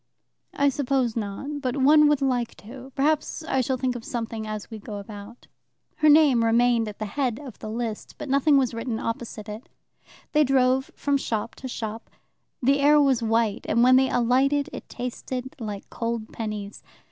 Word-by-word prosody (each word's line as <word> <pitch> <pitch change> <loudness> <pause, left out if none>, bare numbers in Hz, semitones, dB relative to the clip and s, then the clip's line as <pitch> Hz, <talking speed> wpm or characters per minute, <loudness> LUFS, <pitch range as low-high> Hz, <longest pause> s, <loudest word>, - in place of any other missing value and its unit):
" - - -53
I 285 0 +3
suppose 265 -4 0
not, 235 +7 -4
but 255 0 -2
one 300 +3 +6
would 295 -2 +2
like 245 -3 0
to. 255 +4 -11
Perhaps 305 +3 0
I 265 -4 0
shall 260 +1 -1
think 255 -1 -1
of 240 - -6
something 225 -2 -4
as 215 +1 -6
we 220 - -6
go 205 0 -7
about." 205 +3 -10 0.5
Her 305 - +4
name 290 -6 +6
remained 230 0 +3
at 210 - -7
the 215 - -4
head 245 +1 -1
of 270 -6 -10
the 215 - -6
list, 225 -1 -4
but - - -6
nothing 280 +2 +4
was 255 -3 +1
written 230 0 -3
opposite 230 -2 -5
it. 215 +3 -8 0.6
They 300 0 +4
drove 260 -1 +2
from 285 -1 +1
shop 230 -4 -3
to 260 - -6
shop. 225 -2 -6 0.5
The 275 +3 +4
air 295 +1 +5
was 270 -4 +3
white, 225 -2 0
and 235 +2 +3
when 255 +1 +6
they 265 0 +4
alighted 275 +5 +2
it - - -8
tasted 250 +1 -5
like 210 -4 -6
cold 230 -1 -4
pennies. 210 -2 -5
245 Hz, 185 wpm, -25 LUFS, 225-275 Hz, 0.6 s, one